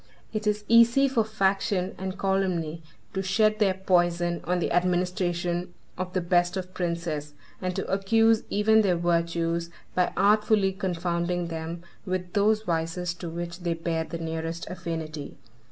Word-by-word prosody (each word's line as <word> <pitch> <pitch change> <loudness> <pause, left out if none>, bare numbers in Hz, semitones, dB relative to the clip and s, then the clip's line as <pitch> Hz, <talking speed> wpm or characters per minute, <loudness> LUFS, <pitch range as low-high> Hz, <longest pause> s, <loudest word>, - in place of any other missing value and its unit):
It 215 -1 -2
is 210 0 0
easy 235 +4 +6
for 250 -4 +2
faction 195 -3 0
and 190 0 -4
calumny 185 -5 0 0.3
to 190 - -1
shed 215 +3 +2
their 195 -3 +3
poison 175 -2 +1
on 180 +1 +1
the 175 - -1
administration 175 -1 0 0.2
of 185 0 -4
the 185 - +1
best 175 +1 +2
of 185 0 -5
princes, 170 -5 -3 0.3
and 185 -1 -2
to 195 - -2
accuse 225 +3 +3
even 220 +2 +4
their 190 -4 +2
virtues 170 0 0 0.2
by 180 -1 +2
artfully 205 -1 +3
confounding 175 -2 -1
them 165 +1 -5 0.2
with 185 -2 -3
those 215 +1 +3
vices 170 0 -1
to 175 -1 -7
which 170 +1 -5
they 170 -2 -1
bear 165 0 -1
the 170 - -6
nearest 165 0 -4
affinity. 160 -4 -5
180 Hz, 150 wpm, -27 LUFS, 170-195 Hz, 0.3 s, easy